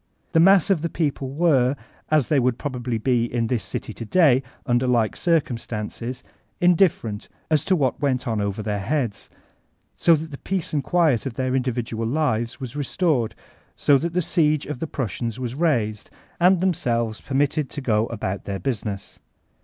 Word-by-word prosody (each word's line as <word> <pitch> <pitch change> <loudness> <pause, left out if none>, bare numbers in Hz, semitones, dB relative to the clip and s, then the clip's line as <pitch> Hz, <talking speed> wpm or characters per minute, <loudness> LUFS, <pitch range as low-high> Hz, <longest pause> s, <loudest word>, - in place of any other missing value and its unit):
The 165 - +3
mass 195 +2 +6
of 175 -6 +2
the 170 - -1
people 145 -5 -2
were, 140 -3 +2 0.3
as 155 -5 +3
they 150 - +3
would 125 -1 +1
probably 125 -4 -3
be 120 0 +1
in 115 -1 0
this 115 -1 -1
city 110 - -5
to 115 - -7
day 135 0 +4 0.2
under 120 +1 +1
like 120 -3 +2
circumstances, 125 -5 -2 0.4
indifferent 170 - +2 0.2
as 155 -1 +3
to 190 - +3
what 135 -5 0
went 135 -2 0
on 110 -3 0
over 100 +1 -2
their 105 -1 -2
heads, 110 -3 -2 0.7
so 170 - +5
that 160 +1 -5
the 140 - -8
peace 190 -4 -3
and 145 -2 0
quiet 155 -8 +2
of 130 - -5
tfieir 130 +1 -1
individual 120 -3 -2
lives 120 -4 -1
was 130 -2 -7
restored, 145 -4 0 0.4
so 140 -2 +4
that 170 +3 -3
the 180 - +2
si^e 155 -3 +1
of 145 -4 -5
the 165 - -3
Prusiians 115 -3 -3
was 125 -2 -4
raised, 120 -9 0 0.3
and 180 0 +4
themselves 120 -11 0
permitted 140 +1 0
to - - -5
go 115 -4 +1
about 100 -4 -4
their 100 -1 -3
business. 105 -5 -4
130 Hz, 175 wpm, -23 LUFS, 115-155 Hz, 0.7 s, mass